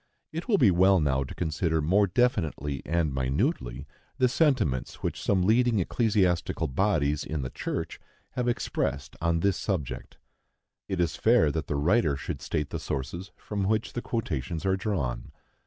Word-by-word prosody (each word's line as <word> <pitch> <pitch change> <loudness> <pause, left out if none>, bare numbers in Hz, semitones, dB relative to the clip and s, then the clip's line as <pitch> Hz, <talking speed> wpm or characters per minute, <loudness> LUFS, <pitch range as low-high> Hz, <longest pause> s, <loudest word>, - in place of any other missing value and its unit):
It 165 +6 -5
will 215 -5 +4
be 115 - +5
well 95 +2 +5
now 70 -3 +1
to 65 - -9
consider 80 0 0
more 95 +7 +3
definitely 80 - 0
and 80 -3 +1
minutely 65 -1 -1 0.3
the 130 -2 +4
sentiments 125 - +1
which - - -2
some 95 -3 +2
leading 115 +3 +3
ecclesiastical 95 -3 +1
bodies 75 -2 +1
in 75 -3 -3
the 65 - -5
church - - -4 0.3
have 125 -1 -2
expressed 70 - -2
on 85 0 +1
this 100 0 +2
subject. 65 - -4 0.7
It 95 - -3
is 85 -2 +1
fair 115 -9 +4
that 80 +1 -3
the 75 - -1
writer 80 +2 +2
should - - -5
state 75 - -2
the - - -3
sources 85 +9 -4
from 100 -2 -3
which 110 +2 0
the 120 - -3
quotations 85 - -3
are 95 0 +3
drawn. 90 - -3
85 Hz, 160 wpm, -27 LUFS, 70-105 Hz, 0.7 s, be